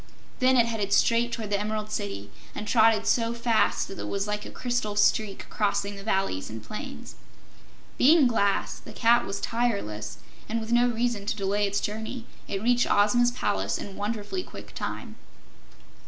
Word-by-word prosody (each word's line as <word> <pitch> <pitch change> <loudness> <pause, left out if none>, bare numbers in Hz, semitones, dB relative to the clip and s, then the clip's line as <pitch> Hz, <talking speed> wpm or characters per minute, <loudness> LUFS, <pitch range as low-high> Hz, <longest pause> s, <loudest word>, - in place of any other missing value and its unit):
Then 255 0 +4
it 235 - +5
headed 215 -4 -1
straight 235 +1 +3
toward 220 -3 -4
the 200 - +2
Emerald 215 0 -3
City, 100 - -4 0.2
and 210 - -5
trotted 225 -1 +4
so 230 -1 +1
fast 235 -1 +1
that 195 - -9
it - - -4
was 200 0 -1
like 210 0 -3
a - - -8
crystal 240 -4 -2
streak 205 0 +1
crossing 205 -1 0
the 200 - -8
valleys 190 - -1
and 110 0 -7
plains. 215 - -7 0.9
Being 305 +2 +6
glass, 200 -5 +1
the - - -12
cat 235 +1 +3
was 195 0 -3
tireless, 200 - -2 0.3
and 230 +1 0
with 220 +1 -6
no 240 +1 +5
reason 230 -3 -1
to - - 0
delay 205 +1 0
its 200 0 0
journey, 220 +3 -4 0.2
it 195 +1 -3
reached 245 +1 +3
Ozma's 225 +4 +4
palace 245 -4 -1
in 195 - -7
wonderfully 215 - -3
quick - - -11
time. - - -5
215 Hz, 170 wpm, -27 LUFS, 200-235 Hz, 0.9 s, Being